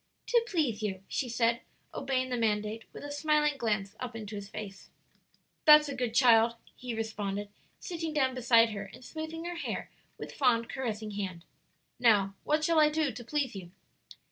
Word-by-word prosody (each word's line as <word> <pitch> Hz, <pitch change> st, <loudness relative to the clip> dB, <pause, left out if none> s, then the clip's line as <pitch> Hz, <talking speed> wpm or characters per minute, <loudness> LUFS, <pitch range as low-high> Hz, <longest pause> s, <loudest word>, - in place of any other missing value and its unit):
"To 475 Hz, -1 st, +4 dB
please 285 Hz, -, 0 dB
you," 195 Hz, -3 st, -3 dB
she 255 Hz, -, -2 dB
said, 235 Hz, 0 st, +1 dB, 0.3 s
obeying 260 Hz, -1 st, -1 dB
the -, -, +1 dB
mandate 215 Hz, -1 st, -1 dB
with -, -, -10 dB
a 290 Hz, -, -6 dB
smiling 300 Hz, 0 st, +2 dB
glance 210 Hz, -5 st, -1 dB
up 245 Hz, -2 st, -5 dB
into 215 Hz, -2 st, -7 dB
his 200 Hz, -1 st, -7 dB
face. 200 Hz, -2 st, -8 dB, 0.8 s
"That's 300 Hz, -1 st, +8 dB
a 280 Hz, -, -4 dB
good 245 Hz, -3 st, -2 dB
child!" 235 Hz, -2 st, +5 dB, 0.2 s
he 245 Hz, -2 st, -5 dB
responded, 205 Hz, -2 st, -3 dB, 0.3 s
sitting 330 Hz, -3 st, -4 dB
down 265 Hz, -4 st, +1 dB
beside 230 Hz, -2 st, +4 dB
her 200 Hz, -2 st, -5 dB
and 250 Hz, -, -14 dB
smoothing 320 Hz, +3 st, -6 dB
her 350 Hz, 0 st, -4 dB
hair -, -, -4 dB, 0.3 s
with -, -, -7 dB
fond, 235 Hz, -4 st, +2 dB
caressing 220 Hz, -5 st, -3 dB
hand. 185 Hz, -4 st, -5 dB, 0.5 s
"Now, 205 Hz, -5 st, +4 dB
what 305 Hz, +1 st, +1 dB
shall 330 Hz, 0 st, +3 dB
I 305 Hz, -1 st, +6 dB
do 305 Hz, -2 st, 0 dB
to 245 Hz, -, -9 dB
please 270 Hz, -1 st, -2 dB
you?" 185 Hz, -3 st, -8 dB
235 Hz, 175 wpm, -30 LUFS, 215-295 Hz, 0.8 s, That's